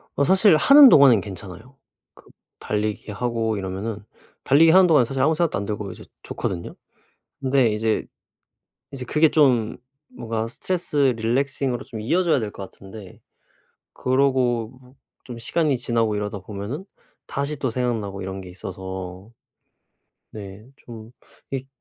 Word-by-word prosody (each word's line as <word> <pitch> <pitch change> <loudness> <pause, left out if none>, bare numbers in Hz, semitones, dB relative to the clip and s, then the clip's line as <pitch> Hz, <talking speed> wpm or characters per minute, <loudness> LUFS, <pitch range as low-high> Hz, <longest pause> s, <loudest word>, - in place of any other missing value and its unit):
어 140 - +2
사실 190 +1 +5
하는 275 - +8
동안은 130 - +6
괜찮아요. 100 +5 -10 0.4
그 - - -20 0.3
달리기 105 0 -3
하고 115 0 -2
이러면은 100 +3 -5 0.4
달리기 160 +4 +5
하는 185 0 +6
동안은 150 -7 +4
사실 135 +2 -3
아무 155 +3 +3
생각도 170 - 0
안 100 - -3
들고 105 -1 -4
이제 - - -12 0.2
좋거든요. 85 -3 -5 0.6
근데 130 -2 +2
이제 110 +1 -1 0.9
이제 130 -2 -7
그게 155 +4 +3
좀 125 -7 +2 0.3
뭔가 115 -1 -4
스트레스 175 +5 -4 0.2
relaxing으로 130 +2 -1
좀 115 -4 -8
이어져야 170 +5 +1
될 105 -3 -4
것 100 - -9
같은데 95 0 -12 0.7
그러고 130 -3 +1
뭐 125 +2 -20 0.3
좀 120 -2 -8
시간이 145 +4 0
지나고 115 -3 0
이러다 105 0 -4
보면은 100 - -7 0.4
다시 140 +1 -2
또 130 - -2
생각나고 110 -5 -3
이런 95 +1 -6
게 90 - -11
있어서. 95 +2 -8 1.0
네 100 0 -10
좀 115 -2 -12 0.4
이 135 -1 -4
115 Hz, 315 characters per minute, -22 LUFS, 105-140 Hz, 1.0 s, 하는